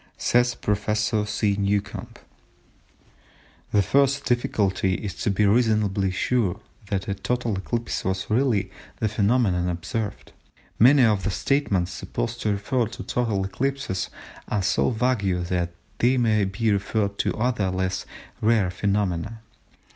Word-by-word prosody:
Says 120 0 +2
Prof. 105 0 -2
S. 105 0 +1 0.3
Newcomb:—"The 100 0 -4
first 140 +4 +2
difficulty 100 -6 +1
is 100 -1 -4
to - - +1
be 100 +1 +2
reasonably 105 -3 +2
sure 100 +1 0 0.3
that 95 -1 -2
a 100 - 0
total 120 +2 -1
eclipse 115 +5 -3
was 95 0 -2
really 115 -2 +1 0.3
the 110 - 0
phenomenon 105 -4 +2
observed. 95 +5 -4 0.5
Many 130 +4 +7
of 105 -4 +3
the - - 0
statements 95 -5 0
supposed 65 -5 -4
to 105 - +1
refer 110 +4 0
to - - -8
total 110 -6 -1
eclipses 135 -2 -2 0.4
are 105 -2 -1
so - - +2
vague 110 -7 0
that 85 -1 0 0.3
they 125 +2 +3
may 110 -4 +3
be 105 +3 0
referred 100 0 -1
to - - 0
other 110 -4 0
less 95 0 -2 0.3
rare 110 -4 +3
phenomena. 100 +2 -1
105 Hz, 130 wpm, -24 LUFS, 95-120 Hz, 0.5 s, Many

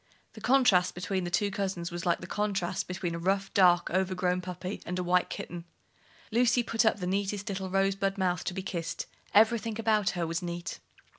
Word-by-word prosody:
The - - -11
contrast 245 -9 +4
between 185 +1 -2
the - - -2
two 200 +3 +1
cousins 190 -3 -3
was 175 0 -4
like 170 - +2
the - - -6
contrast 195 -3 -1
between 180 -1 -3
a 170 - -4
rough, 195 +2 0
dark, 175 -2 +4
overgrown 180 0 0
puppy 180 +1 -6
and 180 - -4
a 180 - -1
white 180 0 +2
kitten. 175 -1 -6 0.7
Lucy 240 +1 +3
put 230 0 +1
up 220 - +3
the 180 - -4
neatest 200 +2 -1
little 190 -1 -3
rosebud 195 +1 +1
mouth 180 -3 0
to 180 - -3
be 190 - -3
kissed: 170 -4 -4 0.3
everything 225 +1 +3
about 215 -3 +2
her 170 - 0
was 165 +2 -2
neat. 175 0 -5
190 Hz, 195 wpm, -29 LUFS, 180-205 Hz, 0.7 s, contrast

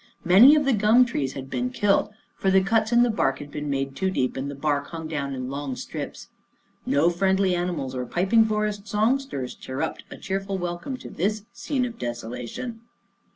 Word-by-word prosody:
Many 215 - +8
of 295 -2 +2
the 270 - +3
gum 220 +4 +5
trees 140 - -2
had 135 -1 -7
been 250 - -2
killed, 205 -5 +2 0.3
for 195 - 0
the 190 0 +4
cuts 220 +2 +1
in 240 0 +5
the 245 - +2
bark 135 -10 +1
had 145 0 -9
been 150 0 -4
made 135 -1 -2
too 190 +7 0
deep, 130 -9 -1
and 135 +1 -3
the 140 - -6
bark 145 0 -1
hung 165 -1 -6
down 140 -3 -3
in 130 0 -5
long 140 -2 -4
strips. - - -7 0.6
No 160 +5 +3
friendly 190 +1 +2
animals 175 -7 -2
or 125 -1 -4
piping 190 - +3
forest 210 -1 -2
song 220 +7 +2
sters 140 - -5
chirruped 135 +5 -4
a - - -9
cheerful 195 0 -3
welcome 175 +9 -4
to - - -10
this 210 +4 -1
scene 260 -4 -1
of 235 -1 -7
desolation. 120 - -5
185 Hz, 200 wpm, -25 LUFS, 140-220 Hz, 0.6 s, Many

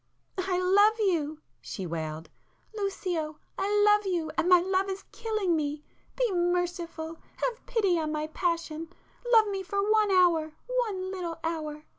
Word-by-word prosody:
"I 365 -1 0
love 405 +4 +4
you!" 315 -7 0 0.2
she 190 - -6
wailed—"Lucio, 305 - -5 0.2
I 415 +1 +2
love 415 -1 +4
you, 325 -3 -1
and 335 +1 +1
my 360 -1 +8
love 380 +2 0
is 385 +1 -4
killing 430 -5 0
me! 295 -1 -2 0.3
Be - - +1
merciful!—have 350 +4 -2
pity 395 -8 +2
on 310 -1 -2
my 305 0 -1
passion!—love 335 +8 0
me 390 -1 -2
for 390 +2 -5
one 430 -1 +4
hour, 340 -5 +3
one 430 -7 -1
little 350 -3 -4
hour! 305 -2 -3
360 Hz, 135 wpm, -28 LUFS, 320-405 Hz, 0.3 s, my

